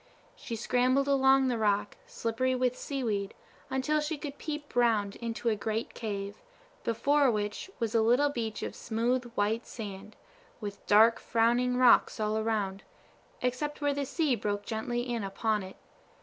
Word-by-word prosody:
She 230 - -6
scrambled 255 +4 +2
along 270 -1 +4
the 240 -3 0
rock, 205 -1 +1
slippery 255 +3 -1
with 250 0 +1
seaweed, 225 -9 -3 0.3
until 265 +4 +1
she 300 +1 -2
could 285 -1 -7
peep 295 -2 -6
round 220 -5 +2
into 230 0 -4
a 225 - +3
great 220 +2 -3
cave, 200 -2 -5 0.4
before 280 +4 +3
which 210 - -2
was 230 -2 -2
a 225 - +4
little 245 +6 +4
beach 225 -5 -4
of - - -4
smooth, 240 +2 -1
white 215 +3 0
sand, 210 -2 -8 0.4
with 205 -3 -7
dark, 220 +2 +6
frowning 240 +2 +2
rocks 250 -2 +5
all 215 0 0
around, 215 -3 -1 0.6
except 255 +4 -1
where 290 -1 +1
the 280 -1 -2
sea 310 -3 +1
broke 205 -1 -3
gently 240 +2 -2
in 235 -3 -2
upon 210 +2 -1
it. 190 0 -9
230 Hz, 155 wpm, -30 LUFS, 215-260 Hz, 0.6 s, dark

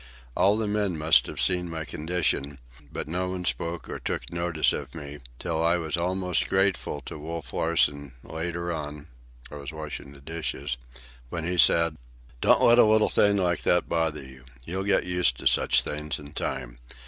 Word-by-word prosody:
All 100 +2 +4
the 110 - 0
men 105 -4 0
must 80 +1 +4
have - - -6
seen 90 -2 +1
my 80 -1 -4
condition, 75 -4 -1 0.3
but - - -4
not 90 +3 -2
one 90 -1 -4
spoke 85 -1 -2
or - - -5
took - - -4
notice 85 -2 +1
of - - -6
me, 75 -2 -7 0.2
till 80 +1 -2
I 85 +1 +4
was 80 -1 -2
almost 90 +1 0
grateful 95 -6 +1
to 75 - -8
Wolf 80 +2 -6
Larsen, 70 -4 +1
later 85 +2 -4
on 75 -1 -6 0.4
(I 75 - -7
was 70 +1 -7
washing 75 -3 -7
the 70 - -14
dishes), 70 -3 -4 0.5
when 85 +3 -4
he 90 +2 -1
said: 85 -2 +5 0.4
"Don't - - +5
let 120 +1 +7
a - - +9
little 110 0 +4
thing 100 0 +3
like 90 -3 +1
that 90 -1 +2
bother 80 -3 -1
you. 65 -1 -14 0.2
You'll 95 +3 -3
get 100 -1 +2
used 90 -8 +2
to - - -10
such 60 - +4
things 75 +1 -3
in 75 0 -11
time. - - -4
85 Hz, 185 wpm, -27 LUFS, 75-90 Hz, 0.5 s, a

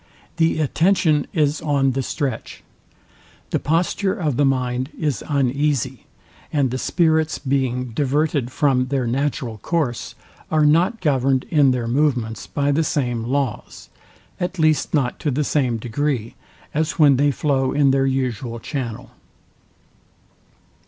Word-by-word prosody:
The 165 -1 +2
attention 155 0 +2
is 150 -2 +1
on 140 -3 +1
the 135 +1 -1
stretch: 135 +1 -4 0.9
The - - +1
posture 180 +5 0
of 150 -6 -1
the 145 - +3
mind 130 -1 0
is 145 -9 -1
uneasy; 140 -1 0 0.4
and 140 -4 +1
the 130 - -2
spirits 160 -2 +1
being 130 -2 -1
diverted 145 0 0
from 130 -2 +1
their 135 -2 -1
natural 125 -2 -2
course, 150 - -2 0.3
are 155 -1 +3
not 180 +8 +3
governed 135 -4 +2
in 145 -4 +5
their 125 -2 0
movements 120 -4 0
by 145 0 0
the 155 +3 +2
same 120 -6 -1
laws, 130 -3 -3 0.5
at 180 +1 -3
least 155 -1 +2
not 130 -4 0
to 150 - -1
the 145 +2 0
same 130 -5 0
degree, 120 0 -2 0.4
as 155 +1 0
when 145 -5 +5
they 145 +2 +3
flow 135 -1 0
in 140 -2 +3
their 135 0 +2
usual 125 -3 -2
channel. 120 -3 -5
140 Hz, 135 wpm, -21 LUFS, 125-150 Hz, 0.9 s, in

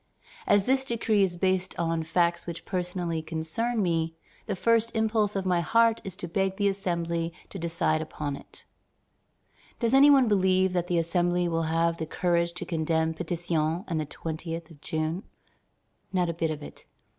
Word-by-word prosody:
As 200 -1 +4
this 265 +1 +3
decree 230 -4 +1
is 180 -3 +1
based 185 0 0
on 165 -1 0
facts 170 +1 +1
which 170 -1 -6
personally 180 -3 -2
concern 165 +9 -2
me, 165 -2 0 0.3
the 205 - -1
first 230 +3 +2
impulse 220 -2 +1
of 195 -1 -1
my 180 -2 +2
heart 230 +6 +3
is 190 - -6
to 175 - -6
beg 190 +2 0
the 205 -1 +2
Assembly 170 -4 -1 0.2
to 195 - -7
decide 165 -2 0
upon 150 -2 -4
it." - - -12 1.1
Does 235 0 +1
any 275 +2 +8
one 270 -4 +6
believe 190 -2 +3
that 175 -1 0
the 175 - +1
Assembly 175 +1 +1
will 165 -1 0
have 165 +1 +1
the 160 - -4
courage 170 0 +1
to 180 - -5
condemn 160 -1 0
Pétion 170 0 -1
and 165 -3 -1
the 150 - -4
20th 165 +1 -5
of 145 -3 -16
June? 160 +3 -2 0.9
Not 180 -2 +1
a - - -1
bit 165 0 -1
of 150 -1 -4
it. - - -12
175 Hz, 175 wpm, -27 LUFS, 165-195 Hz, 1.1 s, any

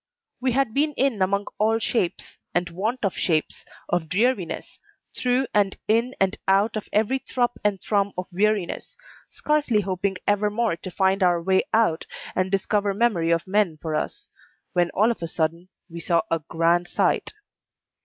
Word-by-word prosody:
We 255 -1 0
had 270 -4 +1
been 300 +3 +1
in 260 -7 0
among 200 +2 +1
all 220 +1 +3
shapes, 225 -5 -2 0.2
and 175 0 0
want 215 +7 -2
of 195 - 0
shapes, 155 -3 -1 0.2
of 175 -3 -1
dreariness, 205 -2 -1 0.4
through 250 +1 +1
and 200 -2 +2
in 230 +4 +2
and 195 -1 +1
out 200 +4 +3
of 215 - -5
every 225 +5 +2
thrup 245 -2 -1
and 205 -2 +1
thrum 200 0 0
of 185 - -2
weariness, 205 0 -1 0.3
scarcely 295 -8 +1
hoping 190 0 -2
ever 205 +1 +2
more 220 -2 0
to 170 - -8
find 190 +1 +1
our 175 -2 +4
way 190 +2 +2
out 220 -8 +2 0.3
and 185 0 +1
discover 200 +1 0
memory 205 -7 +2
of 165 0 +1
men 190 -4 +1
for 160 0 -4
us, 410 - -3 0.5
when 175 -1 +2
all 215 +4 +4
of 235 - -6
a 165 - -2
sudden 165 +2 -2 0.2
we 170 -1 -8
saw 170 +1 +1
a 165 - +2
grand 170 +1 +2
sight. - - 0
200 Hz, 170 wpm, -24 LUFS, 175-225 Hz, 0.5 s, our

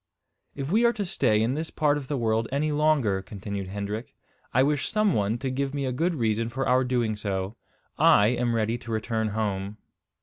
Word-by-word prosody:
"If 140 +2 -4
we 220 +4 +4
are 235 0 +4
to 205 -4 -3
stay 110 - +2
in 120 +3 +1
this 160 +3 -3
part 150 -2 +2
of 145 -3 -5
the 145 - -2
world 115 -1 +1
any 150 +3 0
longer," 145 -10 +2
continued 100 0 -6
Hendrik, 100 +4 -5 0.4
"I 130 - +4
wish 145 0 0
some 215 -2 +2
one 105 +2 0
to 130 +1 -3
give 135 +2 -2
me 140 -1 -1
a 130 - -1
good 165 +7 0
reason 115 -3 0
for 130 +3 -2
our 130 +1 +4
doing 120 -4 0
so. 100 0 -3 0.4
I 105 +1 +6
am 120 -1 0
ready 115 +1 0
to 115 - -8
return 110 0 -1
home." 105 -1 -2
120 Hz, 205 wpm, -26 LUFS, 105-140 Hz, 0.4 s, I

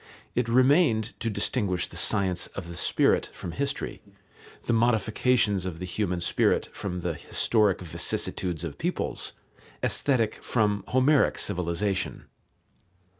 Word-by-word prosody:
It 120 -1 0
remained 125 - +3
to 115 - -1
distinguish 100 -4 0
the - - -13
science 95 -1 +2
of 95 -4 -5
the 85 - -7
spirit - - +2
from 85 - -6
history, 140 +9 -3 0.6
the 120 - 0
modifications 115 -2 +2
of 85 -3 -5
the 90 - -5
human 90 -1 -2
spirit 85 - +2
from 90 -3 -4
the 85 -1 -2
historic 105 +6 +1
vicissitudes 85 0 -2
of 80 -4 -6
peoples, - - -2 0.5
Aesthetic 115 -6 +1
from 105 -4 +1
Homeric 130 +3 +3
civilization. 95 +1 -2
100 Hz, 125 wpm, -27 LUFS, 90-120 Hz, 0.6 s, remained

